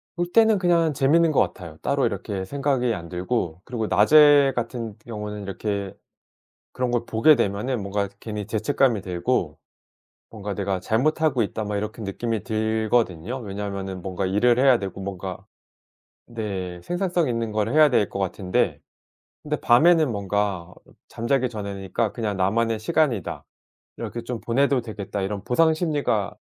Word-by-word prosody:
볼 175 0 -1
때는 220 -3 +5
그냥 170 -4 +2
재밌는 155 +4 +3
것 - - +4
같아요. 85 -4 -4
따로 - - +1
이렇게 95 -2 -3
생각이 135 -2 0
안 85 -3 -7
들고 90 -2 -2
그리고 115 -4 -3
낮에 145 +3 +6
같은 115 -2 -4
경우에는 105 -2 -6
이렇게 100 0 -4 0.8
그런 125 -1 -2
걸 120 -1 0
보게 115 +8 +5
되면은 115 +1 -1
뭔가 100 0 -2
괜히 105 -2 -5
죄책감이 115 +1 +1
들고 90 - -1 0.7
'뭔가 105 -2 -5
내가 100 -2 -1
잘못하고 130 - +1
있다.' 110 +1 -3
막 105 0 -3
이렇게 105 +2 -4
느낌이 110 +2 -3
들거든요. 110 -1 0
왜냐하면은 100 -2 -5
뭔가 95 +1 -3
일을 120 +6 +3
해야 130 -3 +5
되고 95 0 -6
뭔가 95 -1 -6 0.8
네, 95 -6 -5
생산성 175 - -1
있는 115 -2 -2
걸 105 0 0
해야 150 0 +5
될 105 -5 +2
것 - - -6
같은데. 95 -1 -1 0.6
근데 150 0 -2
밤에는 155 +4 +4
뭔가 100 -3 -2 0.4
잠자기 125 +2 0
전이니까 100 0 -3
그냥 105 -4 -3
'나만의 110 +4 +1
시간이다. 115 - 0 0.5
이렇게 120 - -5
좀 120 -1 -5
보내도 135 +2 +2
되겠다.' 105 -3 -5
이런 100 0 -3
보상심리가 150 - +1
110 Hz, 330 characters per minute, -24 LUFS, 100-130 Hz, 0.8 s, 낮에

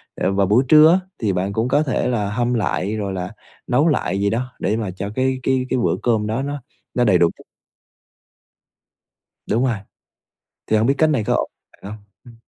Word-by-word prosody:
ờ, 95 - 0
vào 100 0 +2
buổi 110 +7 +4
trưa 155 +3 +7
á 185 - +4 0.2
thì 105 -4 0
bạn 95 +2 -2
cũng 110 +3 0
có 145 +4 +2
thể 135 -4 -1
là 110 -5 -1
hâm 120 +3 0
lại, 105 -2 -1
rồi 100 -3 -3
là 90 0 -4 0.4
nấu 140 +6 +3
lại 125 -9 0
gì 100 0 +1
đó 125 +4 -3
để 105 +3 0
mà 105 -5 -3
cho 95 +2 -5
cái 130 0 0
cái 130 0 +1
cái 130 - 0
bữa 120 - +1
cơm 110 -3 +1
đó 110 +4 -1
nó 145 0 -4 0.3
nó 125 - +1
đầy 100 -6 +4
đủ 85 -1 +4
chất. - - -16 2.1
Đúng 115 +4 +1
rồi. 120 -4 0 0.9
Thì 110 - +2
hông 110 +3 +2
biết 140 - +2
cách 160 - +3
này 135 -8 +1
có - - 0
ổn - - -2 0.2
bạn 100 - -11
hông? 105 -1 -10 0.2
Ừm. 120 -1 -14
115 Hz, 215 wpm, -20 LUFS, 100-130 Hz, 2.1 s, trưa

